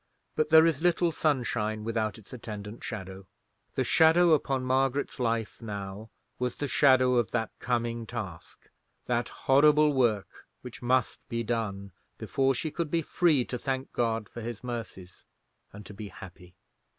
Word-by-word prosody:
But 155 - +1
there 160 0 +8
is 160 -3 +1
little 175 0 +2
sunshine 120 -8 -1
without 110 -1 -2
its 110 +1 -15
attendant 110 -2 -8
shadow. 95 -3 -7 0.5
The - - +1
shadow 165 +2 +5
upon 135 -3 +1
Margaret's 135 +2 0
life 115 -3 -1
now 100 0 -6 0.3
was 125 0 -1
the 145 - -3
shadow 130 -2 +4
of 120 -5 +1
that 115 -2 -2
coming 120 -2 -2
task—that 120 +3 -6
horrible 150 +2 +4
work 115 -7 0
which 125 -2 -9
must 125 0 +1
be 115 -1 -2
done—before 110 +3 -2
she 155 +5 -3
could 170 -1 -3
be 165 +1 0
free 150 -6 +2
to 125 - -5
thank 130 +1 -3
God 115 -3 -1
for 120 - -9
His 115 0 -6
mercies, 115 -7 -7 0.4
and 105 +1 -11
to 105 - -10
be 105 +1 -7
happy. 90 -2 -13
120 Hz, 150 wpm, -28 LUFS, 110-135 Hz, 0.5 s, there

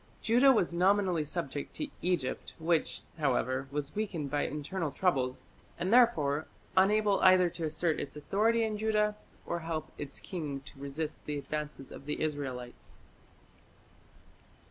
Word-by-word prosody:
Judah 245 +5 +5
was 190 -9 +2
nominally 185 -2 +3
subject 145 -2 -4
to 300 - -2
Egypt, 175 -8 -1
which, 165 0 0 0.2
however, 130 -2 +1
was 145 0 -3
weakened 175 -10 -3
by 145 0 +1
internal 155 +3 -3
troubles, 135 -7 0 0.3
and 185 +5 0
therefore 160 - +4 0.3
unable 205 +1 +4
either 185 -2 +6
to 165 - -4
assert 155 +1 0
its 145 - -5
authority 220 +9 +2
in 215 -1 -1
Judah 210 -1 +2 0.3
or 170 - -2
help 160 -2 -4
its 140 -2 -5
king 150 -7 -4
to 135 0 -14
resist 150 +3 -4
the 150 -1 -2
advance 150 -2 -5
of 140 - -10
the 150 - -2
Israelites. 135 -5 -4
160 Hz, 140 wpm, -31 LUFS, 145-195 Hz, 0.3 s, either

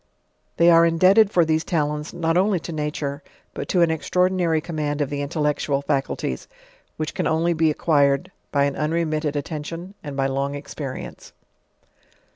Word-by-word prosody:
They 170 +1 +6
are 165 0 +7
indebted 185 +6 +5
fur 175 -5 +3
these 160 0 +1
talents 150 -2 -1
not 165 -1 -1
only 190 +1 +2
to 170 - -6
nature, 150 -2 -3 0.3
but - - -6
to 180 - +2
an 165 - +2
extraordinary 180 0 +1
command 155 -2 -3
of 145 -1 -1
the 145 0 -2
intellectual 145 -1 -1
faculties, 135 -1 -2 0.5
which 155 -1 -3
can - - -1
only 165 +2 +1
be 160 -1 +2
acquiied 140 -3 +2 0.2
by 140 -1 +2
an 140 -1 0
unremitted 155 -1 -1
attention, 160 +5 -5
and 145 -2 -6
by 135 - +1
long 135 +1 -1
experience. 140 -2 -7
155 Hz, 155 wpm, -23 LUFS, 145-170 Hz, 0.5 s, are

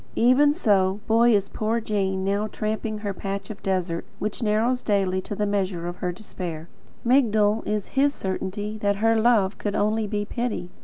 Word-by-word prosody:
Even 255 +5 +5
so, 200 - +2
Boy, 230 +1 +4
is 200 -1 +1
poor 220 +2 -1
Jane 195 -3 -1
now 200 +2 0
tramping 215 0 -3
her 200 - -1
patch 195 +1 -5
of 210 - -10
desert, 185 -3 -1
which 210 +3 -4
narrows 230 +3 +1
daily 190 -3 +1
to 205 - -6
the 210 - 0
measure 190 -4 -1
of 175 - -5
her 180 - -2
despair. 170 -4 -7 0.4
Migdol 220 -4 +3
is 210 -2 -2
HIS 280 +1 +3
certainty 205 0 -4
that 200 -1 +1
HER 225 +3 +2
love 220 -4 +3
could 205 -1 -2
only 215 +1 +1
be 205 0 -2
pity. 225 -6 -3
210 Hz, 175 wpm, -24 LUFS, 190-220 Hz, 0.4 s, Even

